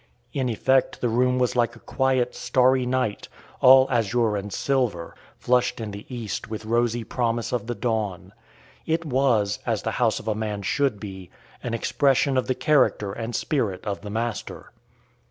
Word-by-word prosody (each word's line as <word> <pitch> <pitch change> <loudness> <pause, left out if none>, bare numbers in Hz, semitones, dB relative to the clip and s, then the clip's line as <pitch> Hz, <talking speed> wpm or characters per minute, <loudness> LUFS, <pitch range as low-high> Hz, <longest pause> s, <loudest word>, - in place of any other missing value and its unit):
In 130 -3 -1
effect 130 +3 +1
the 120 - 0
room 125 +2 +2
was 125 -1 +1
like 120 -1 +1
a - - -14
quiet, 130 -1 0
starry 130 0 +2
night, 125 -5 -1 0.3
all 130 +1 +8
azure 115 -2 +1
and 100 0 -4
silver, 120 -10 -1 0.2
flushed 125 0 +1
in 110 -2 -5
the 100 +1 -9
East 115 -3 -5
with 110 0 -6
rosy 120 +1 +1
promise 115 0 -1
of 115 -3 -2
the 120 - -3
dawn. 110 -7 -2 0.5
It 165 +1 0
was, 125 -7 +1
as - - -1
the - - -1
house - - +2
of - - -12
a 110 - +2
man 105 -1 -4
should 135 +1 0
be, 95 -4 -8 0.3
an 115 -1 -3
expression 135 +3 +2
of 130 - +1
the 130 - 0
character 115 -10 +2
and 115 +1 -5
spirit 110 -11 -1
of 100 -2 -3
the 105 - -7
master. 110 -1 -4
120 Hz, 170 wpm, -24 LUFS, 105-130 Hz, 0.5 s, all